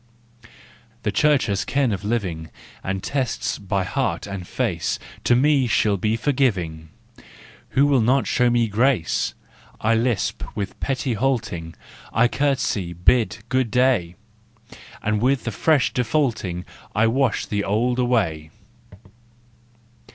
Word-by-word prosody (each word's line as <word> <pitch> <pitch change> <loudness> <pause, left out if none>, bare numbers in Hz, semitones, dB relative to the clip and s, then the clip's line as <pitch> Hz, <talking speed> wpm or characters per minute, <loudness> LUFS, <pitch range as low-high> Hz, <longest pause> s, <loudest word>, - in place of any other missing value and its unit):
The 105 - 0
Church 145 +6 +3
has 100 -2 -1
ken 135 -4 +1
of 100 -1 -3
living, 95 -8 -2 0.3
And 95 0 -3
tests 135 -3 -2
by 100 -1 -1
heart 90 - -2
and 100 -3 -6
face. - - -1 0.3
To 120 - +5
me 140 0 +3
she'll 110 -2 +2
be 105 +4 0
forgiving! 95 - 0 0.9
Who 140 - +6
will 140 -4 +3
not 130 +4 +3
show 125 -1 +2
me 120 -1 +2
grace? 110 - +1 0.4
I 110 +1 +2
lisp 115 -2 0
with 100 -2 -4
pretty 135 -2 -1
halting, 110 -9 -2 0.4
I 120 +2 +4
curtsey, 120 -10 0
bid 110 +6 +2
" 115 - -34
good 130 -2 +1
day," 120 -9 +2 0.9
And 105 0 0
with 130 +1 +2
the 115 - -3
fresh 150 +4 +2
defaulting 115 - -1 0.3
I 110 - +4
wash 125 +1 +1
the 100 -1 -2
old 120 +5 0
away! 100 -11 0
115 Hz, 130 wpm, -22 LUFS, 100-130 Hz, 0.9 s, Who